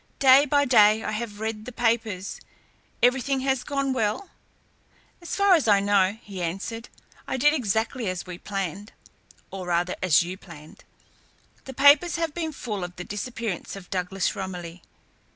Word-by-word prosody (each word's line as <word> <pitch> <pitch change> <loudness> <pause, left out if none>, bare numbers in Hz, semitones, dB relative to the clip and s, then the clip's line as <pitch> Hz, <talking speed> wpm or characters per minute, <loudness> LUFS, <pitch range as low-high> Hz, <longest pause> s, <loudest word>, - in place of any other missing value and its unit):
Day 270 +2 +6
by 285 +1 +3
day 220 -3 +5
I - - -3
have 215 -1 -5
read 220 -1 -4
the 250 - -7
papers. 225 -5 -1 0.6
Everything 265 +2 +2
has 265 -1 0
gone 275 -2 -1
well?" 225 - -2 0.9
"So 400 +3 -2
far 395 - +7
as 320 -9 +3
I 205 -2 +5
know," 200 0 +2
he 195 -3 -7
answered. 195 +7 -4 0.4
"I - - -2
did 295 +4 +4
exactly 225 -3 -1
as 185 -1 -4
we 180 -1 -8
planned 195 +1 -5 0.6
or 185 -1 -6
rather 175 +1 0
as 175 -3 +4
you 180 +2 -6
planned. 160 -5 -14 0.8
The 265 - -9
papers 285 +5 +5
have 330 -2 -2
been 325 -1 -3
full 215 -9 -5
of 180 0 -7
the 180 - -6
disappearance 210 -1 -5
of 195 -2 -12
Douglas 190 +1 -1
Romilly. 180 -3 -6
215 Hz, 160 wpm, -25 LUFS, 185-260 Hz, 0.9 s, far